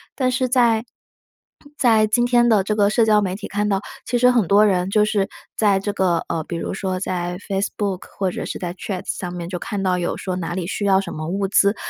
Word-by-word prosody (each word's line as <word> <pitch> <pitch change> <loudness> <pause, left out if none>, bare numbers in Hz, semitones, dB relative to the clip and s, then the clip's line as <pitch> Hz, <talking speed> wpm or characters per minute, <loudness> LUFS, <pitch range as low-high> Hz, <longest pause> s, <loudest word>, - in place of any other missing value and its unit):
但 255 -2 +1
是 255 0 0
在， 235 -3 +3 0.9
在 220 -3 +4
今 240 +3 +2
天 240 -1 +3
的 210 -3 +4
这 210 +2 -1
个 205 -1 +3
社 220 +1 +3
交 210 -1 +4
媒 185 -2 -2
体 205 - -7
看 210 +1 -1
到， 195 -1 +1 0.3
其 245 - +1
实 250 +1 +5
很 230 -7 +2
多 205 +3 +5
人 185 -2 +1
就 210 +1 +3
是 205 -2 0 0.3
在 205 -3 +3
这 200 +1 -3
个， 180 -3 +1
呃， 160 -2 -1
比 170 - -5
如 - - -4
说 190 -1 -3
在 180 -2 -3
Facebook 195 -1 -2 0.2
或 190 -2 0
者 - - -5
是 - - -5
在 175 -1 -4
Twitter 185 +1 -5
上 180 -2 -4
面 175 -1 -6
就 180 0 -4
看 200 +1 -4
到 180 -1 +1
有 175 - -2
说 185 -1 -4
哪 175 0 -4
里 185 - -3
需 200 +3 -4
要 195 -1 +4
什 195 - -5
么 155 0 -5
物 195 +2 -1
资， 200 +2 +3
200 Hz, 325 characters per minute, -21 LUFS, 185-215 Hz, 0.9 s, 实